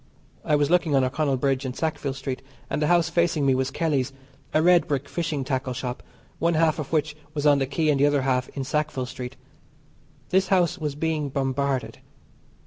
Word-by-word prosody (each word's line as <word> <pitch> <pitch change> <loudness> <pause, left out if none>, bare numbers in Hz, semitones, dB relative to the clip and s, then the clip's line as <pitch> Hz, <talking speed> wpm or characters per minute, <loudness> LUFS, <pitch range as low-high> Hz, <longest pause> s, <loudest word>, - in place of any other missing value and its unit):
I 150 - +2
was 145 +1 +2
looking 175 -5 +3
on 135 - +4
O'Connell 135 +1 0
Bridge 135 0 0
and 130 -1 -4
Sackville 150 -4 -2
Street, 135 -1 -4 0.3
and - - -1
the 150 - +2
house 175 -1 +4
facing 170 -3 +1
me 135 - +4
was 130 0 0
Kelly's 140 -4 0 0.4
a - - +3
red 175 +2 +5
brick 140 -1 -1
fishing 155 -5 -2
tackle 130 -1 -2
shop, 125 0 -4 0.4
one 170 +1 +2
half 160 0 +2
of 150 - -5
which 155 -1 0 0.2
was 145 0 -2
on 145 -1 +5
the 135 - 0
Quay 155 +3 0
and 145 -2 +2
the 145 - +5
other 145 -2 +2
half 125 -1 0
in 135 - -1
Sackville 150 -1 -1
Street. 125 0 -7 0.9
This 190 +1 +3
house 180 -2 +2
was 150 -3 -3
being 155 -1 -1
bombarded. 135 0 -1
145 Hz, 200 wpm, -25 LUFS, 135-160 Hz, 0.9 s, red